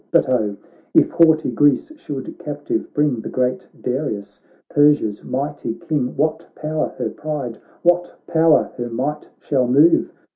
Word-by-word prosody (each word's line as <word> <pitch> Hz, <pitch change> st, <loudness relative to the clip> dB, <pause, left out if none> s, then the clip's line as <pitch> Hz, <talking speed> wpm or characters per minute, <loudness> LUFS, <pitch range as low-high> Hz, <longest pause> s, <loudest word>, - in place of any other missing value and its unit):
But -, -, +3 dB
oh, 110 Hz, -5 st, 0 dB, 0.4 s
if -, -, +5 dB
haughty 160 Hz, -2 st, +4 dB
Greece 145 Hz, -, +3 dB
should 140 Hz, -, -7 dB
captive 145 Hz, -1 st, -4 dB
bring 145 Hz, -6 st, +1 dB
The -, -, -6 dB
great 130 Hz, +9 st, -1 dB
Darius, 125 Hz, -6 st, -3 dB, 0.3 s
Persia's 145 Hz, -8 st, +3 dB
mighty 140 Hz, -3 st, -3 dB
King, 135 Hz, -5 st, -2 dB
What 155 Hz, +2 st, 0 dB
power 155 Hz, 0 st, -2 dB
her -, -, -2 dB
pride, 145 Hz, -6 st, -5 dB, 0.2 s
what 175 Hz, 0 st, +2 dB
power 160 Hz, -1 st, +3 dB
her 120 Hz, 0 st, -3 dB
might 135 Hz, +6 st, -3 dB
shall 130 Hz, -4 st, 0 dB
move 145 Hz, +7 st, +4 dB
145 Hz, 140 wpm, -20 LUFS, 125-155 Hz, 0.4 s, if